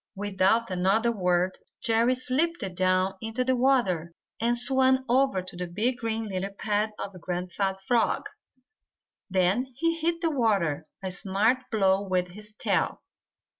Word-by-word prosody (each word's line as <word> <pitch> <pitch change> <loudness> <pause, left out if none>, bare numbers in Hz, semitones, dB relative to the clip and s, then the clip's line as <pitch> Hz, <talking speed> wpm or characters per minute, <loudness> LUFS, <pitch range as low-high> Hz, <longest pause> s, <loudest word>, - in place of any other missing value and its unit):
Without 205 +3 +1
another 195 +6 +2
word 180 -3 0 0.2
Jerry 230 +3 +2
slipped 290 +7 -1
down 185 +1 +1
into 225 +3 -2
the 260 0 +2
water 195 -11 +1 0.2
and 235 +1 +2
swam 260 +1 +3
over 255 -6 +2
to 185 - -9
the 180 0 -4
big 220 +8 -1
green 225 0 -2
lily 190 -1 -3
pad 210 +2 -1
of 190 -3 -7
Grandfather 185 +2 -2
Frog. 235 0 +2 1.1
Then 190 +7 +2
he 330 +5 +1
hit 335 +1 0
the 330 -2 +1
water 200 - +1 0.2
a 190 - -3
smart 205 +8 0
blow 195 -3 +2
with 185 -2 -1
his 210 +3 -11
tail. - - -1
210 Hz, 140 wpm, -27 LUFS, 185-245 Hz, 1.1 s, swam